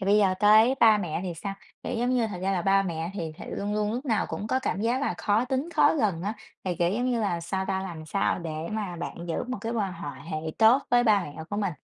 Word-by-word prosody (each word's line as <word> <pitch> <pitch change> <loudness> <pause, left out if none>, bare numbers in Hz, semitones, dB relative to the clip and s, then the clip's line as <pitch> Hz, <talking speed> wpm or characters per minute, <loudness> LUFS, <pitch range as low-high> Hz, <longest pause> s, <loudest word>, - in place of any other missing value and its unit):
thì - - -3
bây 205 +1 +5
giờ 195 -3 +3
tới 220 +5 +6
ba 220 -2 +7
mẹ 170 -5 -3
thì 180 -3 -4
sao? 195 +4 -5 0.3
Kiểu, - - -3
giống 245 +2 +1
như, 245 -3 +2
thật 200 -4 -6
ra 195 +1 +1
là 180 -3 0
ba 195 0 +4
mẹ 170 -2 -3
thì 165 -5 -4
th - - -9
luôn 205 +1 -3
luôn 210 0 0
lúc 250 +4 -3
nào 225 -6 +1
cũng 210 - -4
có 260 - +1
cảm 260 -7 -2
giác 235 +4 +1
là 280 - 0
khó 210 +3 +2
tính 265 +4 -2
khó - - +5
gần 205 - 0
á, 205 +3 -2 0.3
thì, 180 -2 -1
kiểu, 170 -1 +2
giống 235 +6 -1
như 240 -2 0
là 180 -5 0
sao 190 +3 -2
ta? 190 -1 0
Làm 165 -4 -7
sao 195 +4 0
để 165 -3 -5 0.2
mà 205 -5 -3
bạn 175 - -5
giữ 165 - -2
một 255 - -3
cái 230 0 -3
quan 205 -5 -1
hòa 165 -4 -6 0.2
hệ 155 - -2 0.2
tốt 230 +5 +6
với 245 0 +4
ba 210 -3 +5
mẹ 145 - -8 0.2
của 205 - -2
mình? 200 -4 0
205 Hz, 285 wpm, -27 LUFS, 180-225 Hz, 0.3 s, ba